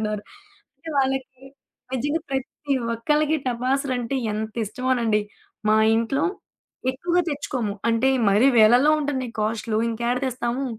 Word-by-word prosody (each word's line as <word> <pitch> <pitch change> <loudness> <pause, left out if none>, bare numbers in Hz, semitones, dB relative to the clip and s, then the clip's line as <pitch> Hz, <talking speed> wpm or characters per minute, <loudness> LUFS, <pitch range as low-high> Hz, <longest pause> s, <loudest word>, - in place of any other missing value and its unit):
అంటున్నారు. 210 -1 -2 0.5
అంటే 330 - -12
వాళ్ళకి 265 -1 -1 0.5
నిజంగా 290 +6 -1
ప్రతి 270 +1 -2 0.2
ఒక్కళ్ళకి 300 +6 +1
టపాసులంటే 255 +1 -1 0.2
ఎంత 215 0 -4
ఇష్టమోనండి. 230 -1 0 0.5
మా 215 - +5 0.2
ఇంట్లో 230 +5 0 0.7
ఎక్కువగా 350 +6 0
తెచ్చుకోము. 255 -7 -2 0.2
అంటే, 230 +4 +2 0.2
మరీ 215 +7 +4
వేలల్లో 245 +7 +6
ఉంటున్నయి 260 -5 -2
కాస్టులు. 220 0 -1
ఇంకేడ 235 +2 -1
తెస్తాము. 250 +1 -2
255 Hz, 110 wpm, -23 LUFS, 225-275 Hz, 0.7 s, వేలల్లో